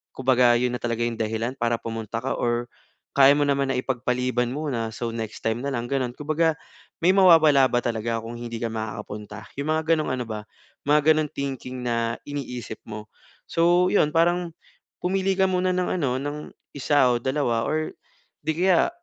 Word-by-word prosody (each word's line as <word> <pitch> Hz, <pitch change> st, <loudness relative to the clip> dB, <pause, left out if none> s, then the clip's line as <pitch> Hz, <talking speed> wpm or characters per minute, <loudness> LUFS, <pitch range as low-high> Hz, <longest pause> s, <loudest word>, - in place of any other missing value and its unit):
Kumbaga 125 Hz, -2 st, +4 dB
'yon 125 Hz, +1 st, +1 dB
na -, -, -4 dB
talaga 120 Hz, -1 st, -2 dB
yung 120 Hz, -1 st, -2 dB
dahilan 115 Hz, +4 st, -2 dB
para 120 Hz, 0 st, +1 dB
pumunta 115 Hz, 0 st, -4 dB
ka 135 Hz, -, -2 dB
or 120 Hz, 0 st, -1 dB, 0.5 s
kaya 140 Hz, 0 st, +8 dB
mo 145 Hz, -, +2 dB
naman 140 Hz, -1 st, +1 dB
na 135 Hz, -, 0 dB
ipagpaliban 125 Hz, -1 st, -1 dB
muna, 135 Hz, -6 st, -2 dB
so 120 Hz, +1 st, -3 dB
next 110 Hz, -2 st, -6 dB
time 115 Hz, +1 st, 0 dB
na 140 Hz, -, -2 dB
lang 120 Hz, -4 st, -2 dB
ganon, 125 Hz, -1 st, -2 dB
kumbaga, 155 Hz, +2 st, +1 dB, 0.4 s
may 180 Hz, +3 st, +5 dB
mawawala 160 Hz, -8 st, +6 dB
ba 120 Hz, -, +1 dB
talaga 115 Hz, 0 st, -1 dB
kung 115 Hz, +1 st, -7 dB
hindi 120 Hz, -1 st, -5 dB
ka 115 Hz, 0 st, -3 dB
makakapunta, 105 Hz, -1 st, -6 dB
yung 140 Hz, +2 st, -3 dB
mga 160 Hz, +1 st, +2 dB
ganong 155 Hz, -2 st, 0 dB
ano 125 Hz, -1 st, -3 dB
ba 110 Hz, -1 st, -5 dB, 0.5 s
mga 150 Hz, +1 st, +5 dB
ganong 155 Hz, -1 st, 0 dB
thinking 130 Hz, -2 st, -5 dB
na 115 Hz, -1 st, 0 dB
iniisip 125 Hz, -6 st, -6 dB
mo. 105 Hz, -1 st, -7 dB, 0.4 s
So 175 Hz, +2 st, +3 dB
'yon 150 Hz, -7 st, +4 dB
parang, 175 Hz, +1 st, +2 dB, 0.5 s
pumili 190 Hz, +1 st, +1 dB
ka 190 Hz, -, +4 dB
muna 185 Hz, 0 st, +1 dB
ng 180 Hz, 0 st, 0 dB
ano 130 Hz, -5 st, 0 dB
ng 145 Hz, +1 st, -4 dB, 0.4 s
1 145 Hz, -1 st, +3 dB
o -, -, +2 dB
2 130 Hz, -3 st, 0 dB
or 155 Hz, +1 st, -1 dB, 0.5 s
di 155 Hz, +1 st, -1 dB
kaya, 180 Hz, -1 st, +4 dB
130 Hz, 180 wpm, -24 LUFS, 115-155 Hz, 0.5 s, kaya